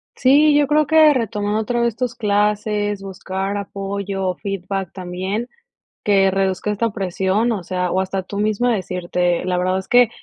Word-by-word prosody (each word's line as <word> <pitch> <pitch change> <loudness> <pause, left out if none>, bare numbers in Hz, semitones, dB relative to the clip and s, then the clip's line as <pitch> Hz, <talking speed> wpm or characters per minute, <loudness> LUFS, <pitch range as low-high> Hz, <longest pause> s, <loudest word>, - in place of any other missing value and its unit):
Sí, 290 +3 +5
yo 290 -1 +3
creo 300 +1 +3
que 315 0 +6
retomando 215 -4 -1
otra 240 +2 -1
vez 235 -2 0
tus 250 -1 -2
clases, 210 -1 0
buscar 195 +1 -4
apoyo 195 -1 -4
o 180 - -1
feedback 195 -1 -4
también, 190 +6 -4 0.5
que 195 -2 +3
reduzca 195 +1 0
esta 230 +3 0
presión, 195 +3 0
o 205 -5 -3
sea, 180 0 -2
o 190 - +1
hasta 190 0 -3
tú 200 +2 -6
mismo 215 +3 +1
decirte 180 -4 -1
la 180 -1 0
verdad 185 +1 +1
es 190 - -5
que 245 -2 +5
200 Hz, 170 wpm, -20 LUFS, 190-225 Hz, 0.5 s, que